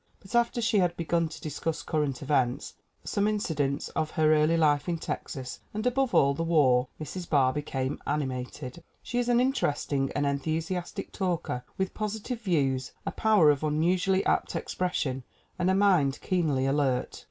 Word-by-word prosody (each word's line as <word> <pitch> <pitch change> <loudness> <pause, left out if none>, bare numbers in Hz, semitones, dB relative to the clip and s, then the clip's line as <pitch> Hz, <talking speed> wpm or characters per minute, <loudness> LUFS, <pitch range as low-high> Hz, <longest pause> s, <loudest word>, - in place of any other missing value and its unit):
But 190 - -14
after 235 0 +2
she 220 -2 +3
had 175 -2 +1
begun 170 0 0
to - - -9
discuss 160 +2 -3
current 145 -4 -1
events, 135 -2 0 0.3
some 205 0 0
incidents 150 -10 -1
of 155 - -2
her 155 0 +5
early 155 +2 +3
life 150 0 +2
in 170 - 0
Texas 130 -4 -5 0.2
and 215 +2 -3
above 255 0 +1
all 140 0 +5
the 140 - -4
war 140 -7 +3
Mrs. 175 +3 -6
Barr 130 -3 +3
became 135 -2 -3
animated. 130 0 -3 0.2
She 245 - -2
is 245 0 0
an 240 0 +4
interesting 145 - 0
and 145 +1 +1
enthusi 155 +6 -1
astic 175 -1 -5
talker 170 -9 -2
with 190 0 -1
positive 220 +3 -4
views, 135 - 0
a - - -1
power 210 -9 +4
of 145 0 -2
unusually 180 +5 +1
apt - - +1
expression 140 -8 -2 0.4
and 180 - +2
a 190 - +3
mind 180 -9 +3
keenly 155 -8 0
alert. 135 -2 0
155 Hz, 165 wpm, -28 LUFS, 140-190 Hz, 0.4 s, her